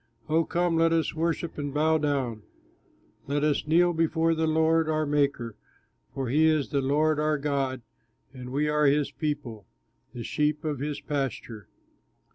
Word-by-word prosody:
Oh 160 Hz, +1 st, +2 dB
come, 175 Hz, -1 st, 0 dB
let 165 Hz, 0 st, +3 dB
us 165 Hz, -3 st, 0 dB
worship 165 Hz, 0 st, -2 dB
and 145 Hz, -1 st, -3 dB
bow 155 Hz, +2 st, +2 dB
down, 135 Hz, -7 st, -1 dB, 0.9 s
Let 145 Hz, +1 st, -1 dB
us 150 Hz, 0 st, 0 dB
kneel 175 Hz, +2 st, +4 dB
before 165 Hz, 0 st, +1 dB
the 160 Hz, 0 st, 0 dB
Lord, 160 Hz, 0 st, +2 dB
our 155 Hz, 0 st, +1 dB
Maker; 140 Hz, -6 st, 0 dB, 0.6 s
For 135 Hz, -2 st, -2 dB
he 155 Hz, +5 st, +4 dB
is 155 Hz, -3 st, +1 dB
the 140 Hz, -2 st, 0 dB
Lord 150 Hz, +3 st, +1 dB
our 155 Hz, 0 st, +1 dB
God, 135 Hz, -3 st, -2 dB, 0.5 s
And 125 Hz, -1 st, -9 dB
we 145 Hz, +3 st, 0 dB
are 150 Hz, -1 st, +2 dB
his 145 Hz, +1 st, +2 dB
people, 135 Hz, -, -4 dB, 0.4 s
the 120 Hz, -1 st, -7 dB
sheep 150 Hz, +3 st, -1 dB
of 150 Hz, -4 st, -2 dB
his 145 Hz, +1 st, -3 dB
pasture. 135 Hz, -7 st, -4 dB
150 Hz, 160 wpm, -27 LUFS, 140-160 Hz, 0.9 s, kneel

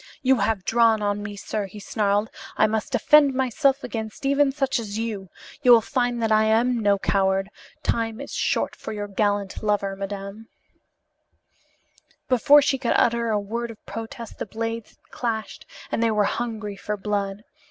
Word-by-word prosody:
"You 265 Hz, 0 st, +4 dB
have 200 Hz, -2 st, 0 dB
drawn 225 Hz, -2 st, +3 dB
on 205 Hz, 0 st, 0 dB
me, 205 Hz, 0 st, -6 dB
sir," 200 Hz, 0 st, -4 dB
he 210 Hz, +2 st, -11 dB
snarled. 205 Hz, +1 st, 0 dB, 0.3 s
"I -, -, +5 dB
must 215 Hz, 0 st, -1 dB
defend 290 Hz, -3 st, +5 dB
myself 270 Hz, +2 st, +1 dB
against 220 Hz, +3 st, -5 dB
even 280 Hz, 0 st, +3 dB
such 270 Hz, -2 st, 0 dB
as 210 Hz, -2 st, -5 dB
you. 215 Hz, -4 st, -4 dB, 0.3 s
You 255 Hz, -, +2 dB
will 235 Hz, -, +8 dB
find 245 Hz, -1 st, -1 dB
that 220 Hz, -, +1 dB
I 215 Hz, 0 st, +4 dB
am 235 Hz, +3 st, +2 dB
no 205 Hz, -2 st, +3 dB
coward. 195 Hz, 0 st, +1 dB, 0.3 s
Time 225 Hz, -1 st, -1 dB
is -, -, -7 dB
short -, -, 0 dB
for -, -, -7 dB
your 205 Hz, -1 st, -4 dB
gallant 205 Hz, -1 st, -1 dB
lover, 205 Hz, -2 st, 0 dB
madam." 200 Hz, +2 st, -6 dB, 1.8 s
Before 280 Hz, +3 st, +6 dB
she 270 Hz, -2 st, +1 dB
could 235 Hz, -, +1 dB
utter 235 Hz, 0 st, +2 dB
a 210 Hz, -1 st, +1 dB
word 235 Hz, +4 st, -4 dB
of 225 Hz, -2 st, -12 dB
protest 225 Hz, 0 st, -8 dB
the -, -, -4 dB
blades 225 Hz, +1 st, -5 dB
had -, -, -36 dB
clashed 225 Hz, -3 st, -4 dB, 0.2 s
and -, -, 0 dB
they 230 Hz, -, +3 dB
were 210 Hz, -1 st, +2 dB
hungry 215 Hz, -1 st, -3 dB
for 210 Hz, +1 st, -4 dB
blood. 200 Hz, 0 st, -2 dB
220 Hz, 175 wpm, -24 LUFS, 205-235 Hz, 1.8 s, will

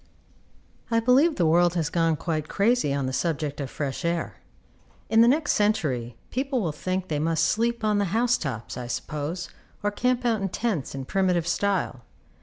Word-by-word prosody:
4. 230 Hz, -, +2 dB
I -, -, +5 dB
believe 260 Hz, +8 st, +4 dB
the 175 Hz, -, +1 dB
world 175 Hz, +2 st, +4 dB
has 165 Hz, -2 st, -1 dB
gone 165 Hz, -2 st, +2 dB
quite 155 Hz, -1 st, -3 dB
crazy 220 Hz, -, +2 dB
on 140 Hz, -1 st, -1 dB
the 130 Hz, -, -3 dB
subject 150 Hz, -1 st, -2 dB
of 135 Hz, -, -4 dB
fresh 140 Hz, +3 st, -4 dB
air. 170 Hz, 0 st, -2 dB, 0.7 s
In 225 Hz, 0 st, +6 dB
the 230 Hz, -, +7 dB
next 290 Hz, +4 st, +3 dB
century 135 Hz, -, 0 dB
people 265 Hz, +1 st, -1 dB
will 175 Hz, -8 st, -1 dB
think 185 Hz, +5 st, -3 dB
they 150 Hz, -2 st, -1 dB
must 160 Hz, +1 st, +1 dB
sleep 235 Hz, +1 st, 0 dB
on 210 Hz, -1 st, +2 dB
the 200 Hz, -, +2 dB
house 235 Hz, +6 st, +2 dB
tops, 125 Hz, -7 st, -5 dB
I 125 Hz, -1 st, -5 dB
suppose, 155 Hz, +7 st, -4 dB, 0.3 s
or 205 Hz, -, +1 dB
camp 250 Hz, +3 st, 0 dB
out 225 Hz, -3 st, +1 dB
in 195 Hz, -, -1 dB
tents 180 Hz, -, -2 dB
in 135 Hz, -1 st, -5 dB
primitive 180 Hz, 0 st, +1 dB
style. 185 Hz, -8 st, 0 dB
175 Hz, 190 wpm, -25 LUFS, 150-225 Hz, 0.7 s, the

